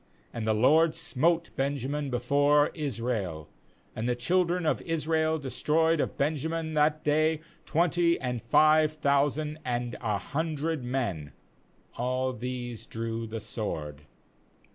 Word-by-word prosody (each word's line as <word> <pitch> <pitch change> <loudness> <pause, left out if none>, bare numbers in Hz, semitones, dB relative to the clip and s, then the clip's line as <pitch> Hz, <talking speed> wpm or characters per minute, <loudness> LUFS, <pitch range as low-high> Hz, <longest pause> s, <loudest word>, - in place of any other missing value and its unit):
3BAnd 115 -2 -4
the 110 -1 +2
LORD 155 +8 +4
smote 170 +5 +1
Benjamin 140 +1 -2
'be 125 - 0
fore 145 +4 +3
Israel; 115 - -3 0.5
and 115 +3 -2
the 125 - +1
children 175 +7 +1
of 155 -4 +1
Israel 160 -1 0
destroyed 155 +4 +1
of - - -2
Benjamin 160 +2 -1
that 155 +1 +2
day 155 +1 +2 0.3
twenty 170 +1 +2
and 125 -3 -3
five 155 +5 +4
thousand 150 +1 0
and 120 -1 -2
a 105 -4 0
hundred 155 - -2
men; 110 - -3 0.6
all 130 +1 -1
these 125 -2 -5
drew 115 0 -4
the 110 +1 -5
sword. 75 -10 -5
140 Hz, 125 wpm, -28 LUFS, 120-155 Hz, 0.6 s, LORD